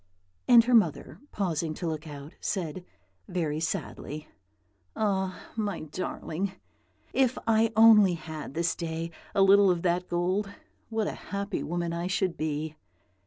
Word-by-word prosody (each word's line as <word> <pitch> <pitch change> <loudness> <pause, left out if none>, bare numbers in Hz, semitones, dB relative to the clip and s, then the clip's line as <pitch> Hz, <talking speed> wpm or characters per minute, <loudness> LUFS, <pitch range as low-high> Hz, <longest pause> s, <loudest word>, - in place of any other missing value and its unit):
And 235 -1 +8
her 245 +2 0
mother, 195 -10 +2
pausing 165 -5 -1
to 175 - -5
look 160 0 -4
out, 145 +1 -9
said, 185 -3 -3 0.4
very 155 -4 -1
sadly, 155 -1 -4 0.7
"Ah, 190 -3 -1
my 210 -4 -2
darling! 185 +3 -4 0.6
if 260 -2 +2
I 225 0 +3
only 215 -5 +7
had 155 -3 -7
this 170 0 +1
day 165 0 -4 0.2
a 195 - +5
little 200 0 +7
of 175 -2 +1
that 180 0 0
gold, 185 +4 0 0.4
what 220 -2 0
a - - -1 0.2
happy 200 0 -2
woman 170 0 -2
I 170 +1 -2
should 190 -2 0
be!" 155 0 -3
180 Hz, 140 wpm, -28 LUFS, 160-200 Hz, 0.7 s, And